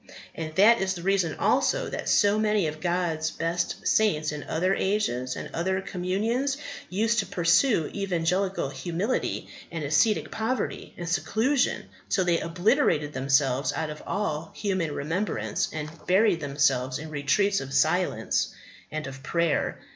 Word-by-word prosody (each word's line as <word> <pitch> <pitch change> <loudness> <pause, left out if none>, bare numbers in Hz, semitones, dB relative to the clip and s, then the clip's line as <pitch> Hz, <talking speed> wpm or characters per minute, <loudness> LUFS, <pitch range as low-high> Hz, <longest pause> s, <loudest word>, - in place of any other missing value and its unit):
And 155 -1 -6
that 215 +4 +6
is 190 0 0
the 170 - -7
reason 190 -3 +1
also - - +2
that - - -4
so 205 0 +4
many 210 -3 +2
of 155 0 -4
God's 170 -3 0
best 170 +2 -2
saints 155 -9 +2
in 150 -1 -5
other 180 +4 +1
ages 160 - 0
and - - -5
other 190 +3 0
communions 215 +10 -1 0.3
used 225 +4 +1
to 200 - -1
pursue 180 - +3
evangelical 185 -3 0
humility 180 - -2 0.2
and 165 -2 -4
ascetic 155 +10 +2
poverty 225 +4 -3
and 175 - -5
seclusion 225 +9 +1 0.3
till 185 - +2
they 170 -1 +2
obliterated 170 - +1
themselves 135 0 +1
out 160 -1 -2
of 150 - -9
all 160 -6 -2
human 190 -6 -1
remembrance, 150 - -2
and 155 -1 -4 0.2
buried 190 -1 +4
themselves 140 -3 +1
in 155 0 -8
retreats 195 +8 +2
of 135 0 -7
silence 135 0 +1 0.3
and 155 -1 -4
of 135 0 -8
prayer. 170 +1 0
175 Hz, 145 wpm, -26 LUFS, 150-200 Hz, 0.3 s, that